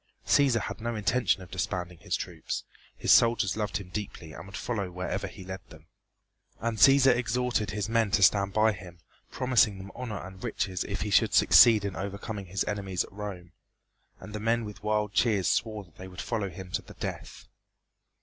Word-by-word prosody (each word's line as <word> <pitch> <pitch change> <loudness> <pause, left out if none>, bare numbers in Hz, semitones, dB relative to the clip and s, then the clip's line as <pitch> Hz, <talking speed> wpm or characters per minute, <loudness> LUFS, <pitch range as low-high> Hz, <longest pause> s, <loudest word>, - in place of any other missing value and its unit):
Cæsar 130 -6 +4
had - - -6
no 120 +1 -2
intention 110 -2 +1
of 90 - -14
disbanding 90 -3 -3
his - - -2
troops. - - -5 0.3
His - - +1
soldiers 115 -4 +4
loved 105 -5 -2
him 95 -2 -9
deeply 90 -6 -6
and 85 +5 -9
would 95 - -8
follow 105 -6 -3
wherever 90 +1 -3
he - - -11
led 95 +1 -6
them. 80 0 -15 0.7
And 115 -1 -2
Cæsar 135 -2 +7
exhorted 120 -2 0
his 105 +1 -2
men 115 -1 +2
to 100 - +1
stand 100 0 +4
by 110 +2 +3
him, 90 -3 -10 0.3
promising 120 -5 +2
them 95 +1 -9
honor 120 -5 -5
and 95 +1 -10
riches 95 -3 -2
if 100 -1 -4
he 105 +1 -2
should - - +4
succeed 110 -4 +7
in 100 - -3
overcoming 100 +1 -5
his 95 +3 -1
enemies 95 -3 -2
at - - -14
Rome, 95 -4 -7 0.7
and 105 - -10
the 105 - -4
men 115 +1 +1
with 105 -1 -9
wild 105 -1 0
cheers 100 -2 +2
swore 110 -2 0
that 85 -5 -23
they 95 - -8
would 90 -1 -11
follow 110 -4 -2
him 90 +1 -10
to - - -1
the - - -14
death. - - -6
100 Hz, 195 wpm, -28 LUFS, 95-110 Hz, 0.7 s, Cæsar